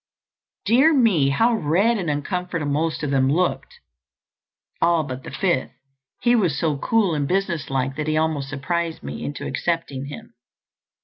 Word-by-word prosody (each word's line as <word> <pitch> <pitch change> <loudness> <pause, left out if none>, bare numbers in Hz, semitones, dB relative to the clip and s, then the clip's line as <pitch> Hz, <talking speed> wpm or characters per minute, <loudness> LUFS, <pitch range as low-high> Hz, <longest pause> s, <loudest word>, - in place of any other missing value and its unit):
Dear 270 +8 +5
me, 200 - +4
how 225 - +3
red 210 +5 +2
and 175 -4 -2
uncomfortable 165 +2 -2
most 160 +2 -1
of 145 - -1
them 135 -1 +2
looked—all 170 - -3
but 130 -2 -6
the - - -7
fifth. 140 0 -1 0.5
He 240 0 +4
was 180 -11 +1
so 155 0 0
cool 215 -3 +2
and 145 -2 -1
business 180 -4 -1
like 135 0 -1
that 150 0 -3
he 155 0 +1
almost 155 -3 0
surprised 165 +4 -3
me 70 +1 -6
into 145 - -5
accepting 140 -2 -2
him." 145 - -10
160 Hz, 150 wpm, -22 LUFS, 140-185 Hz, 0.5 s, Dear